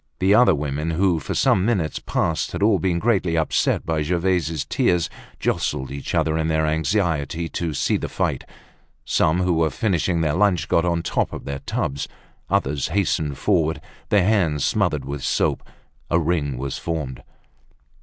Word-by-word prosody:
The 95 +2 +3
other 120 -5 +6
women, 75 +2 -2
who 85 0 +2
for 70 - -4
some 90 - +3
minutes 95 - 0
past 80 -1 -1
had - - -2
all 105 -3 +4
been 85 +1 0
greatly 90 -5 +1
upset 80 - +1
by 80 -1 0
Gervaise's 85 -2 0
tears, 85 +3 +1 0.3
jostled 65 0 -1
each 70 +5 -4
other 80 -1 +1
in 80 - 0
their 80 -1 +1
anxiety 80 -1 0
to 80 -3 -3
see - - +1
the - - -4
fight. - - -1 0.6
Some, 80 +4 +2
who 90 -1 +2
were 80 -1 +2
finishing 90 -3 0
their 75 -2 +1
lunch, 90 -3 +2
got 85 - +2
on 85 -1 +1
the - - -15
tops - - -1
of - - -7
their 70 -1 -4
tubs. 70 +1 -3 0.4
Others 70 0 0
hastened 80 -6 0
forward, 80 -6 +1 0.3
their 100 -4 +4
hands 85 -10 +2
smothered - - 0
with 70 0 -5
soap. - - +1 0.5
A 85 - +3
ring 80 -5 0
was 70 +1 -4
formed. 75 -6 -4
80 Hz, 170 wpm, -22 LUFS, 75-90 Hz, 0.6 s, other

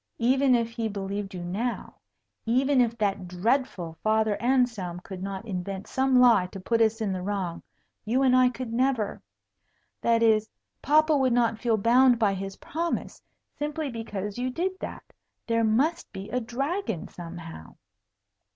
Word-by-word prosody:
Even 260 +2 +3
if 230 -1 0
he 230 -1 -2
believed 200 -1 -4
you 175 - -5
now, 215 +8 -3 0.5
even 260 +3 +3
if 235 -1 0
that 200 -3 -1
dreadful 180 -3 -1
Father 220 -1 +2
Anselm 235 -9 +1
could 185 0 -8
not 195 +2 -5
invent 195 -1 -4
some 265 0 +1
lie 230 -7 +5
to 195 - -9
put 230 +5 0
us 225 0 +2
in 210 -3 0
the 185 - -3
wrong, 185 -3 -3 0.4
you 245 +5 +1
and 255 -1 +4
I 255 -1 +5
could 250 -2 -6
never 245 -4 0 0.8
that 230 0 +3
is 220 -1 +3 0.3
papa 310 +2 +4
would 260 -3 +2
not 230 -2 +2
feel 230 -2 +1
bound 245 +4 +5
by 210 -3 +2
his 195 0 -5
promise 335 +3 -4 0.4
simply 300 -1 -2
because 210 -2 -5
you 255 +1 -1
did 350 +8 -1
that. - - -6 0.4
There 230 -1 +1
must 270 +10 +1
be 195 +2 -8
a 250 - +1
dragon 265 - -3
somehow." 165 - -9
230 Hz, 160 wpm, -27 LUFS, 195-255 Hz, 0.8 s, lie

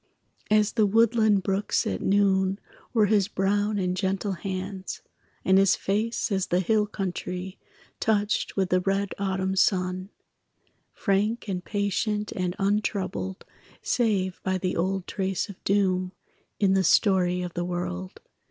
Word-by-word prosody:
As 215 0 +3
the 215 -3 +3
woodland 220 -2 +3
brooks 195 +2 0
at 95 - -2
noon 195 -1 +2 0.3
Were 220 -4 +4
his 205 -2 +3
brown 205 +1 0
and 180 -2 0
gentle 195 +1 -1
hands, 190 0 -5 0.4
And 190 0 +5
his 195 -1 +4
face 215 +4 -1
as 190 -2 0
the 175 - +2
hill 210 +3 +2
country 185 -1 -5 0.4
Touched 210 -1 0
with 190 -2 +1
the 185 - +4
red 195 +1 0
autumn 190 -1 -1
sun 185 -1 +1 0.8
Frank 210 +3 0
and 180 -2 -3
patient 210 +2 -1
and 180 -1 -2
untroubled 195 - -1 0.4
Save 200 -6 0
by 190 -1 0
the 185 0 -2
old 190 +2 -1
trace 190 +1 -2
of 200 - -11
doom 185 -2 +1 0.5
In 195 -2 +3
the 190 -1 +3
story 180 -1 +3
of 175 -1 -5
the 175 - -2
world. 135 - -4
195 Hz, 140 wpm, -26 LUFS, 185-205 Hz, 0.8 s, And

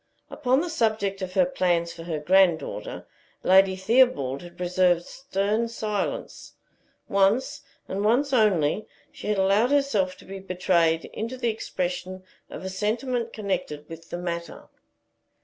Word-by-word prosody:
Upon 260 -1 +1
the 350 - -3
subject 215 -8 0
of 185 -1 -5
her 275 - +5
plans 175 -10 0
for 170 - -10
her 165 -3 -2
granddaughter, 160 - +1 0.4
Lady 190 0 +5
Theobald 190 - +2
had 175 -1 -12
preserved 180 -1 +2
stern 215 -3 -1
silence. 215 -3 -4 0.5
Once, 200 +6 +2 0.3
and 195 +2 -3
once 260 +6 +2
only, 205 - +2 0.2
she - - -9
had 210 -1 +1
allowed 200 +5 +3
herself 275 -11 +1
to - - -16
be 195 0 -7
betrayed 175 -3 +1
into 230 +4 -4
the 240 -2 0
expression 185 -3 -4 0.3
of - - -8
a - - -3
sentiment 230 +5 -2
connected 180 -9 -3
with 165 0 -10
the - - -4
matter. 170 -1 -5
195 Hz, 140 wpm, -25 LUFS, 175-225 Hz, 0.5 s, her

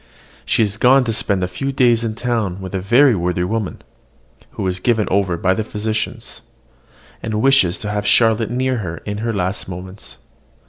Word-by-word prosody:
She - - +3
is 105 0 -2
gone 130 +3 +5
to 115 -2 -1
spend 100 -3 0
a - - 0
few 135 +10 -3
days 120 -3 +3
in 110 -2 -3
the - - -14
town 110 -7 -1
with 95 -1 -8
a 95 - -2
very 120 +7 +5
worthy 90 0 -1
woman, 105 +1 -3 0.7
who - - -4
is 90 0 -1
given 110 -1 +1
over 95 -3 +1
by 95 +2 +2
the 110 - -2
physicians, 110 +1 -4 0.8
and 110 -1 -3
wishes 120 -8 +3
to 105 - -5
have 105 0 -2
Charlotte 115 +1 +3
near 130 +1 0
her 85 -6 -5
in 105 0 -4
her 115 +1 -1
last 95 -1 -2
moments. 95 +2 -9
105 Hz, 190 wpm, -19 LUFS, 95-115 Hz, 0.8 s, gone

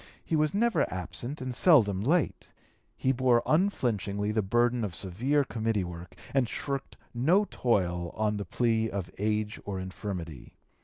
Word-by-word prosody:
He 160 - 0
was 155 +2 +1
never 235 +3 +2
absent 120 - -4
and 130 -1 -3
seldom 115 - +5
late; 155 - 0 0.5
he 130 - +1
bore 125 -2 +3
unflinchingly 105 - 0
the 110 0 +1
burden 120 +4 +1
of 95 -5 -3
severe 125 +11 0
committee 110 -5 -1
work, 85 0 -8 0.2
and 130 -4 +2
shirked 140 -1 -4 0.2
no 165 - +3
toil 90 - 0
on 105 -1 0
the 100 - -4
plea 110 +3 +1
of 95 -4 -4
age 105 0 -1
or 100 -2 -4
infirmity. 90 - -6
110 Hz, 150 wpm, -29 LUFS, 100-130 Hz, 0.5 s, seldom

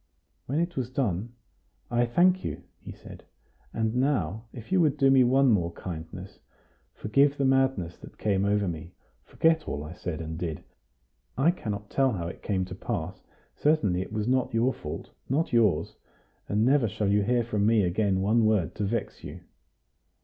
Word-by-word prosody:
When 140 +5 0
it 170 0 -1
was 125 -4 -2
done: 120 -4 -2 0.6
"I 120 0 +2
thank 180 +9 +3
you," - - -5 0.2
he - - -10
said. - - -12 0.5
"And 110 -1 -1
now, 115 - 0
if 120 +6 -11
you 190 -2 +4
would 150 -3 +2
do 135 -1 +4
me 135 -1 +6
one 130 +1 +4
more 85 -5 +1
kindness, 90 +3 -8 0.6
forgive 140 +6 +2
the 140 - +1
madness 130 -10 +1
that - - -13
came 100 -2 +1
over 100 0 +1
me; 85 +1 -6 0.3
forget 160 -1 +1
all 75 0 -3
I 75 +3 -8
said 90 -2 -5
and 80 0 -5
did. 80 -4 -4 0.7
I 145 +6 +4
cannot 105 - -6
tell 135 -3 +2
how 85 -4 -3
it 85 - -8
came 95 -2 -1
to - - -8
pass; - - -4 0.3
certainly 105 - +2
it 95 - -7
was 105 0 -2
not 130 -2 +1
your 120 +3 +2
fault 75 - -7 0.2
not 145 +3 0
yours. 105 -9 +2 0.5
And 105 +2 +2
never 135 -2 +4
shall 100 +1 -1
you 105 +1 +3
hear 120 +3 +1
from 105 -3 0
me 110 -2 +4
again 95 +1 +1
one 110 +4 +3
word 105 -7 +1
to 105 - -1
vex 115 +2 -3
you." - - -8
110 Hz, 180 wpm, -27 LUFS, 95-135 Hz, 0.7 s, me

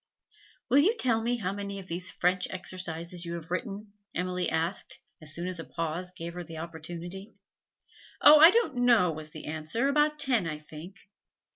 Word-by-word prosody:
'Will 270 - +5
you 395 +11 +4
tell 230 - +2
me 240 +2 0
how 195 -4 -2
many 200 0 -5
of 195 - -8
these 180 +1 -3
French 180 +1 +1
exercises 175 -2 -5
you 170 -1 -5
have 165 0 -9
written?' 200 +1 -4 0.2
Emily 180 0 -1
asked 165 +4 -2 0.2
as 155 0 -5
soon 170 +3 -3
as 185 -2 -4
a - - -4
pause 165 +5 -4
gave 170 -2 -7
her 175 0 -6
the 165 -1 -9
opportunity. 170 +4 -7 0.9
'Oh, 300 0 +9
I 325 +2 +11
don't 430 - +1
know,' 235 -8 +4
was 155 0 -7
the 155 0 -10
answer; 160 - -1
'about 300 +1 +2
ten, 245 - +1
I 155 -2 -3
think. 155 +5 -11
180 Hz, 180 wpm, -29 LUFS, 165-225 Hz, 0.9 s, I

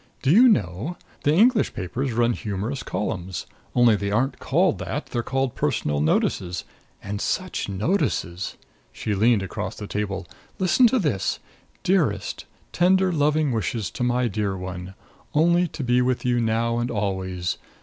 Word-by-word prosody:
Do 135 - +3
you 235 +9 +8
know 105 - 0 0.3
the 145 - +5
English 225 +6 +4
papers 120 +9 -2
run 120 +1 +2
humorous 110 +5 -3
columns! 95 -4 -3 0.3
Only 120 -3 +6
they 100 0 -2
aren't 120 +7 0
called 170 +5 +2
that. 150 - -3
They're 120 - -2
called 135 +1 -1
Personal 75 -1 0
Notices. 85 +3 0 0.4
And 100 +1 -4
such 185 - -2
notices!" 100 - -1 0.3
She 105 - -3
leaned 110 +1 +3
across 95 +1 -4
the 105 - -7
table. 100 -2 -3 0.3
"Listen 190 +7 +5
to 260 - +2
this: 140 - 0 0.5
'Dearest: 150 - 0 0.3
Tender 185 +1 +3
loving 150 -1 +2
wishes 110 -2 -2
to - - -7
my 125 0 +2
dear 100 -2 -2
one. 90 0 -6 0.4
Only 170 +3 +4
to 145 - -6
be 125 0 +3
with 125 0 0
you 120 -1 +2
now 115 +1 +1
and 120 +1 -1
always. 95 -5 -2
115 Hz, 150 wpm, -24 LUFS, 100-145 Hz, 0.5 s, you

